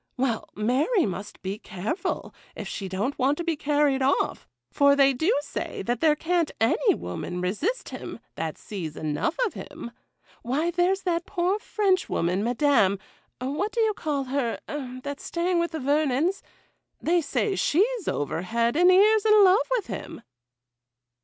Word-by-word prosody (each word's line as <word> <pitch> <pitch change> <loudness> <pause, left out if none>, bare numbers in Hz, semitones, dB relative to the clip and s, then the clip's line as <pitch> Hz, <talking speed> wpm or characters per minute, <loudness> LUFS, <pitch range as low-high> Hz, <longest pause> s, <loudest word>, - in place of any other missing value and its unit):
Well, 245 -4 -1
Mary 270 - +2
must 200 +1 -6
be 195 +2 -4
careful, 205 - -4 0.2
if - - -6
she 195 -2 -5
don't 205 +11 -2
want 275 +3 +2
to 345 - -3
be 335 -1 0
carried 290 -2 +1
off; 270 +2 0 0.2
for 280 -1 +5
they 275 -1 +5
do 320 - +1
say 285 - -5
that 240 +3 -2
there 310 -2 +4
can't 335 +1 0
any 225 - +3
woman 90 - -5
resist 215 - -2
him, - - -7 0.2
that - - -4
sees 170 -8 -6
enough 155 - -1
of 430 - -3
him. 235 - -8 0.5
Why, 295 +8 0
there's 360 +3 +1
that 340 -1 -1
poor 370 +2 0
Frenchwoman, 370 - 0
Madame 240 -5 +3 0.3
—— - - -44
what 300 +11 -2
do 475 - -3
you 440 -1 +3
call 295 -7 -2
her, 260 -3 -1 0.5
that's 285 0 -6
staying 345 +1 0
with 340 0 0
the 320 - -5
Vernons?—they 310 +4 -1
say 385 +6 -1
she's 420 +5 +1
over 145 +3 -1
head 235 +6 0
and 355 +3 +5
ears 415 +3 +5
in 425 -1 +6
love 390 +5 +5
with 460 - -2
him. - - -7
290 Hz, 160 wpm, -26 LUFS, 235-360 Hz, 0.5 s, in